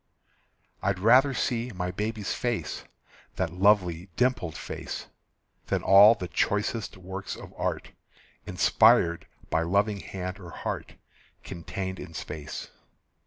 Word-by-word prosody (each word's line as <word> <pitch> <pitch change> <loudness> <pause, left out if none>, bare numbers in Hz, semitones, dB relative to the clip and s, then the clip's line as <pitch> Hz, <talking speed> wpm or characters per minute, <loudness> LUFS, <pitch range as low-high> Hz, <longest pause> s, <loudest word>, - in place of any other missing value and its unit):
I'd 100 -2 0
rather 125 +8 +5
see 120 -1 -1
my 90 0 -2
baby's 105 +2 -3
face, 120 -2 -3 0.5
That 90 -3 -2
lovely 95 -2 +2
dimpled 120 -11 0
face, - - -6 0.6
Than - - 0
all 100 +4 +8
the 90 - -5
choicest 100 +6 -1
works 95 +1 -6
of - - -11
art, - - -3 0.6
Inspired 85 0 +4 0.2
by 80 - +2
loving 100 +4 +1
hand 95 +1 -6
or 90 -3 -10
heart, - - -5 0.5
Contained 95 +2 -5
in 85 -3 -9
space. 75 -1 -6
95 Hz, 120 wpm, -27 LUFS, 90-105 Hz, 0.6 s, all